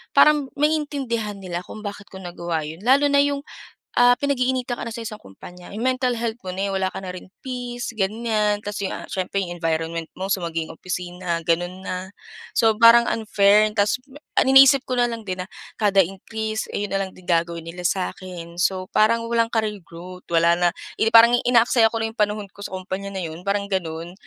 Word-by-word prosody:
parang, 295 -3 +5
maiintindihan 275 -9 -1
nila 180 -2 -5
kung 215 - -10
bakit 205 0 -7
ko 190 - -9
nagawa 175 -3 -4
yun. 160 +2 -8
Lalo 275 +4 +5
na 280 - +5
yung, 285 0 -1 0.5
ah, 245 0 +7
pinag-iinitan 260 -3 0
ka - - -4
na 230 - -6
sa 235 - -6
isang 215 -1 -7
kumpanya, 175 - -13
yung 220 +4 -3
mental 255 -1 +1
health 230 0 -2
mo - - -4
na 195 +2 -2
eh, - - -2
wala 190 -1 0
ka - - -6
na 185 -1 -6
rin 185 - -10 0.2
peace 245 -2 -5
ganyan. 215 0 0
'Tas 205 -1 -5
yung, - - -3
ah, - - -6
siyempre 190 +1 -2
yung 175 0 -7
environment 165 0 -2
mo, 190 +1 -4
so 190 - -2
maging 165 -1 -3
opisina, 180 -1 -4
ganun 175 +2 -1
na. 185 +1 -4 0.5
So, 225 -1 +5
parang 235 +1 +7
unfair, 210 -1 +3
'tas 205 +2 +2 0.4
ang - - +2
iniisip 270 0 +8
ko 255 -2 -2
na 240 - +4
lang 230 -1 -6
din 185 0 -3
na 185 - -7 0.3
kada 200 -2 +4
increase, 220 +4 -4
ay 205 - -1
yun - - -15
na 195 - +1
lang 190 - -10
din 185 - -16
gagawin 170 -1 0
nila 175 +2 -7
sa‘kin. 180 -2 -5
So, 185 0 0
parang 230 +2 +3
walang 230 -1 +3
career 215 -2 -1
growth. 180 +2 -11
Wala 170 0 +3
na 175 0 +4 0.3
yun 225 - +3
eh - - +1
parang 235 +1 +8
inaaksaya 235 -1 +4
ko 230 - -2
na 225 - 0
lang - - -5
yung - - -35
panahon 210 0 -3
ko - - -22
sa - - -5
kompanya 190 +1 -5
na 190 - -3
yun, 165 +1 -7
parang 200 0 0
ganun. 170 -2 -3
200 Hz, 215 wpm, -23 LUFS, 180-230 Hz, 0.5 s, iniisip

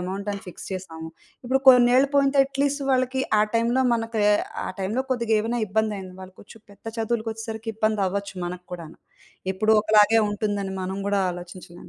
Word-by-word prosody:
అమౌంట‌ని 200 +2 -4
fix 180 - -9
చేసాము. 160 -4 -7 0.4
ఇప్పుడు 265 +2 +1
కొన్నేళ్లు 250 +2 +6
పోయింటే 280 0 +3
at 275 0 -10
least 285 0 0
వాళ్ళకి 255 0 +1 0.2
ఆ - - +5
టైమ్‌లో 235 +3 +2
మనకు, 225 -1 -2 0.5
ఆ - - -3
టైమ్‌లో 215 +7 -1
కొద్దిగేవైనా 230 -1 0
ఇబ్బందయింది 200 -2 -2
వాళ్ళు 185 0 -11
కొంచెం 220 +2 -15
పెద్ద 200 - -22
చదువులకొచ్చెసరికి 225 0 -3
ఇబ్బంది 215 -2 0
అవ్వొచ్చు 200 +1 -4
మనకూడాను. 175 -2 -8 0.5
ఎప్పుడు 215 +3 +2
ఒకలాగే 215 +1 +5
ఉంటుందని 205 -2 -2
మనం 190 +1 -4
గుడా 200 -1 +1
ఆలోచించలేం 175 0 -10
215 Hz, 145 wpm, -24 LUFS, 190-235 Hz, 0.5 s, కొన్నేళ్లు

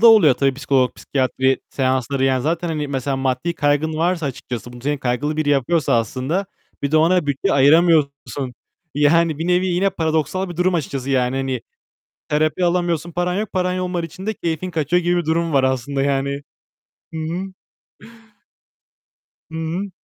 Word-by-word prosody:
da 235 - +7
oluyor 210 - +7
tabii 135 0 +1
psikolog, 130 -2 +1
psikiyatri 130 0 0
seansları. 130 0 0
Yani 130 -1 +2
zaten, 165 +4 -1
hani, 150 -3 -2
mesela 135 0 -2
maddi 135 +5 -1
kaygın 145 +1 +1
varsa 165 -1 0
açıkçası, 120 -3 -6
bunu 120 - -11
senin 145 +1 -1
kaygılı 135 +4 -1
biri 155 -1 0
yapıyorsa 145 +2 +2
aslında, 130 - -2 0.4
bir 140 - 0
de 155 - +3
ona 165 +1 +3
bütçe 140 +8 0
ayıramıyorsun. 140 -3 +3 0.4
Yani 155 +2 +3
bir 165 - -2
nevi, 180 +1 +2
yine 185 +2 +1
paradoksal 160 +1 -1
bir 175 - -8
durum 180 +1 +2
açıkçası 140 -4 -2
yani. 130 -1 +1
Hani, 135 -2 -2 0.7
terapi 155 +4 +1
alamıyorsun, 175 -1 0
paran 175 +1 -1
yok. 210 +1 -2
Paran 180 0 0
olmadığı 180 -2 -2
için 180 +4 -10
de 220 - -1
keyfin 170 -1 -3
kaçıyor 165 +2 +1
gibi 175 +1 +2
bir 175 - -1
durum 165 0 0
var 135 -1 +4
aslında 130 +1 0
yani. 140 0 0 0.7
Hı 160 - -3
hı. 180 +4 -4 2.0
Hı - - -13
hı. 165 +5 -3
155 Hz, 165 wpm, -20 LUFS, 135-175 Hz, 2.0 s, da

